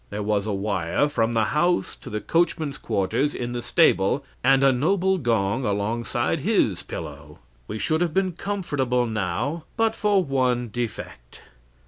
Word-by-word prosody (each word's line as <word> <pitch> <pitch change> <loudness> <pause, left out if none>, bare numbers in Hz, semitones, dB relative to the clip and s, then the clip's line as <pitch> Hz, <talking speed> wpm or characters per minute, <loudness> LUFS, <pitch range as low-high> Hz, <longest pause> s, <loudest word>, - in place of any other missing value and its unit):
There 105 0 -4
was 105 0 0
a - - -1
wire 100 - 0
from 115 -5 0
the 115 -1 +2
house 175 - +1
to - - -10
the 105 - -3
coachman's 160 - 0
quarters 110 +7 0
in 120 0 -3
the 120 0 -3
stable, 140 - +2 0.2
and 135 +2 +4
a 135 - +6
noble 185 +8 +1
gong 115 -2 0
alongside 105 +2 -1
his - - +1
pillow. 75 -1 -8 0.3
"We - - -4
should 155 +8 0
have 175 -2 +1
been 190 +2 +1
comfortable 145 -10 -1
now 115 - -2
but 225 -1 +2
for 205 -3 +2
one 125 -4 0
defect. 105 - -6
125 Hz, 155 wpm, -24 LUFS, 105-155 Hz, 0.3 s, a